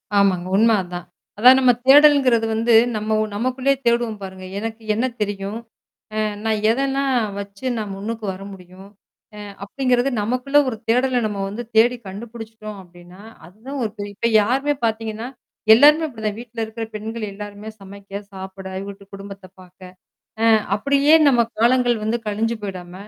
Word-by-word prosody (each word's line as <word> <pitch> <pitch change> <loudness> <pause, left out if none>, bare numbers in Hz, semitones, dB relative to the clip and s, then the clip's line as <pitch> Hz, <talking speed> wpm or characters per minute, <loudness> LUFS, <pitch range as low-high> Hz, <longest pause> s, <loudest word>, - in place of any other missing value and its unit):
ஆமாங்க. 195 -3 +3
உண்ம 225 +1 +5
அதான். 175 -1 -7 0.3
அதான் 255 +5 +7
நம்ம 255 -2 +5
தேடல்ங்கிறது 275 -4 +6
வந்து 230 +1 +2 0.2
நம்ம 215 +1 -1 0.2
நமக்குள்ளேயே 255 +4 0
தேடுவோம் 235 -2 +1
பாருங்க. 190 -1 -8
எனக்கு 225 +1 -6
என்ன 225 +4 0 0.2
தெரியும்? 200 +1 -3 0.6
அ - - -2 0.3
நான் 220 -1 +1
எதன்னா 270 +3 0 0.4
வச்சு 200 +3 -9
நான் 210 -2 -4
முன்னுக்கு 220 +2 -5
வர 190 +1 -10
முடியும்? 185 +1 -13 0.5
அ - - -9 0.2
அப்பிடிங்கிறது 255 +4 0
நமக்குள்ள 255 +6 +1
ஒரு 235 - -3
தேடல 250 +2 +2
நம்ம 210 -2 -4
வந்து 210 +5 -5
தேடி 240 +3 +5
கண்டுபிடிச்சுட்டோம் 220 +1 -9
அப்பிடின்னா, 175 +1 -16 0.3
அதுதான் 235 +10 -8
ஒரு 215 - -2
பெரிய 205 0 -6
இப்ப 230 +3 0
யாருமே 270 +7 0
பார்த்தீங்கன்னா, 225 0 -2 0.5
எல்லாருமே 300 +6 +6
அப்பிடிதான் 220 -7 -4
வீட்ல 235 -1 -8
இருக்கிற 220 +1 -6
பெண்கள் 215 0 -5
எல்லாருமே 205 +1 -8
சமைக்க 200 0 -9
சாப்பிட, 190 0 -9 0.2
வீட்டு 200 0 -11
குடும்பத்த 195 0 -10 0.2
பாார்க்க. 185 0 -14 0.5
அ - - +1 0.3
அப்பிடியே 280 +7 +4
நம்ம 245 -4 +4 0.2
காலங்கள் 245 0 +3
வந்து 225 +2 -1
கழிஞ்சு 225 +2 -1
போயிடாம. 180 -3 -7
220 Hz, 145 wpm, -21 LUFS, 200-245 Hz, 0.6 s, அதான்